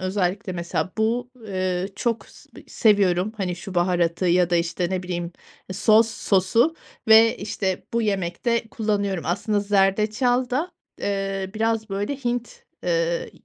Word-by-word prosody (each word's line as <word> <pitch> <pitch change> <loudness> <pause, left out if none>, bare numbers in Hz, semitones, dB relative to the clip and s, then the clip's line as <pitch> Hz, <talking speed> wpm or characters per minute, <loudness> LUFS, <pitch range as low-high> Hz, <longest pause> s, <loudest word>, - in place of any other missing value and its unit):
özellikle, 185 +1 -1
mesela 175 +1 -3
bu, 235 +3 0 0.2
eee, 185 -1 -1
çok 230 -2 -1
s - - -18 0.2
seviyorum, 200 -2 +2
hani, 180 -4 -2
şu 190 +2 -8
baharatı 175 0 +1
ya 180 0 +3
da, 175 - +3
işte, 170 +1 -1
ne 185 -1 -1
bileyim, 175 -1 -4 0.4
sos 220 +4 +4
sosu 220 - +2 0.3
ve, 225 +1 +7
işte, 195 -2 -3
bu 235 - +1
yemekte 215 +4 -1
kullanıyorum. 200 -5 -1
Aslında 205 +4 0
zerdeçal 210 +5 +2
da, 300 +8 -1 0.3
eee, 195 -1 -2
biraz, 225 0 0
böyle, 205 +8 -2
Hint, 245 -2 -4 0.2
ııı, 170 -1 0
195 Hz, 135 wpm, -23 LUFS, 180-220 Hz, 0.4 s, ve